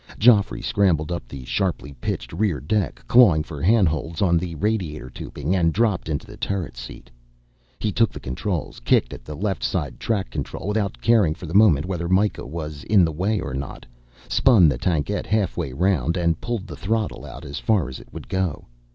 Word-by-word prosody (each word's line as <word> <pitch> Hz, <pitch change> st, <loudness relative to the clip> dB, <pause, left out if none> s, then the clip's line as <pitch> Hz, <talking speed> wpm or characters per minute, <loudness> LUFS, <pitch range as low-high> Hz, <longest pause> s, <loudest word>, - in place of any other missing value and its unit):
Geoffrey 110 Hz, -2 st, +4 dB
scrambled 90 Hz, -6 st, +1 dB
up 85 Hz, -9 st, -4 dB
the 65 Hz, 0 st, -9 dB
sharply 90 Hz, -4 st, -2 dB
pitched -, -, -3 dB
rear 90 Hz, -4 st, 0 dB
deck, 95 Hz, -, -2 dB
clawing 100 Hz, -11 st, +6 dB
for 75 Hz, -2 st, -8 dB
handholds 85 Hz, -5 st, +2 dB
on 90 Hz, -4 st, +3 dB
the 85 Hz, 0 st, -1 dB
radiator 80 Hz, -, -2 dB
tubing, 85 Hz, +9 st, -3 dB
and 85 Hz, -3 st, +3 dB
dropped 105 Hz, -7 st, +1 dB
into 75 Hz, -3 st, -2 dB
the -, -, -12 dB
turret 95 Hz, -9 st, -3 dB
seat. -, -, -10 dB, 0.7 s
He 110 Hz, -, -1 dB
took 115 Hz, +2 st, +2 dB
the -, -, -8 dB
controls, 75 Hz, +7 st, -4 dB
kicked -, -, +2 dB
at -, -, -10 dB
the 75 Hz, +5 st, -7 dB
left 95 Hz, +2 st, -2 dB
side -, -, -2 dB
track 105 Hz, -4 st, -1 dB
control -, -, -5 dB
without 105 Hz, -2 st, -1 dB
caring, 105 Hz, -9 st, +4 dB
for 90 Hz, -, -9 dB
the 80 Hz, -, -7 dB
moment, 95 Hz, -8 st, +5 dB
whether 85 Hz, -2 st, -3 dB
Myka 95 Hz, -5 st, +1 dB
was 75 Hz, -1 st, -6 dB
in 100 Hz, -5 st, +5 dB
the 80 Hz, -, -1 dB
way 95 Hz, +7 st, 0 dB
or 65 Hz, -, -5 dB
not, 65 Hz, 0 st, -6 dB, 0.4 s
spun 115 Hz, -10 st, +5 dB
the 70 Hz, -5 st, +1 dB
tankette 90 Hz, +5 st, -1 dB
halfway 100 Hz, -10 st, 0 dB
round, 85 Hz, 0 st, +1 dB
and 85 Hz, -2 st, +1 dB
pulled 120 Hz, -5 st, -3 dB
the -, -, -8 dB
throttle 110 Hz, +1 st, -2 dB
out -, -, -9 dB
as 70 Hz, -, -5 dB
far 105 Hz, -, +1 dB
as 65 Hz, -, -7 dB
it -, -, -16 dB
would -, -, -9 dB
go. 95 Hz, -5 st, -2 dB
90 Hz, 195 wpm, -23 LUFS, 75-105 Hz, 0.7 s, clawing